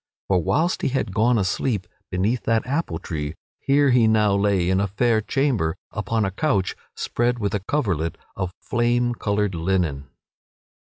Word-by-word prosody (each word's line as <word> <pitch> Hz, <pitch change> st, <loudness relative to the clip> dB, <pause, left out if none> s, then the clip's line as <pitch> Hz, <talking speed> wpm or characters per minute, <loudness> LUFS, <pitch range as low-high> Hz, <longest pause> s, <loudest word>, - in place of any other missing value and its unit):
For 95 Hz, -2 st, +3 dB
whilst 160 Hz, -, +1 dB
he -, -, +1 dB
had 130 Hz, -7 st, -1 dB
gone 115 Hz, +3 st, +3 dB
asleep 100 Hz, +1 st, 0 dB, 0.2 s
beneath 105 Hz, +7 st, 0 dB
that 115 Hz, -1 st, +2 dB
apple 135 Hz, -, -1 dB
tree, 75 Hz, -1 st, -4 dB, 0.2 s
here 140 Hz, 0 st, +3 dB
he 120 Hz, -2 st, +5 dB
now 105 Hz, -2 st, +3 dB
lay 100 Hz, -3 st, +2 dB
in 95 Hz, +1 st, +2 dB
a 100 Hz, -, +1 dB
fair 110 Hz, +3 st, +2 dB
chamber 110 Hz, -, 0 dB
upon 105 Hz, +1 st, -1 dB
a 95 Hz, -, -1 dB
couch 100 Hz, -, 0 dB, 0.2 s
spread 120 Hz, +1 st, 0 dB
with 105 Hz, -2 st, -2 dB
a 105 Hz, -, +1 dB
coverlet 95 Hz, -, -1 dB, 0.2 s
of 95 Hz, -2 st, -3 dB
flame 120 Hz, 0 st, +1 dB
colored 105 Hz, -3 st, -1 dB
linen. 80 Hz, -5 st, -1 dB
105 Hz, 160 wpm, -23 LUFS, 95-120 Hz, 0.2 s, he